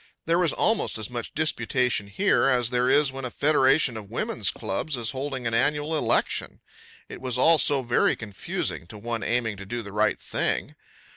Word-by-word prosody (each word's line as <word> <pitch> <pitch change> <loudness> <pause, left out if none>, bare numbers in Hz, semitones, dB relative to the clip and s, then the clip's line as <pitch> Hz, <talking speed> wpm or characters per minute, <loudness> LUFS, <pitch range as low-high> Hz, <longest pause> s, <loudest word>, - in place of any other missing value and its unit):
There 170 +1 +2
was 175 -3 +2
almost 220 - +1
as 110 +1 -5
much 120 -1 -4
of - - -24
disputation 125 -8 0
here 195 - +2
as 125 -3 +2
there 125 +1 +2
is 145 0 +4
when 135 0 -7
a 125 - -3
federation 135 -2 +3
of 105 -3 -8
women's 110 -3 -1
clubs 125 +10 -3
is 115 -2 -1
holding 135 -2 -4
an 115 - 0
annual 150 +6 +1
election. 155 - 0 0.5
It - - -10
was 125 -2 -2
all 160 +5 +5
so 140 -2 +3
very 120 0 +2
confusing 100 -5 -4
to 105 - -10
one 115 +1 -4
aiming 115 -3 -1
to 100 - -9
do 120 +3 -4
the 100 - -9
right 105 0 +1
thing. - - -2
125 Hz, 195 wpm, -25 LUFS, 115-145 Hz, 0.5 s, all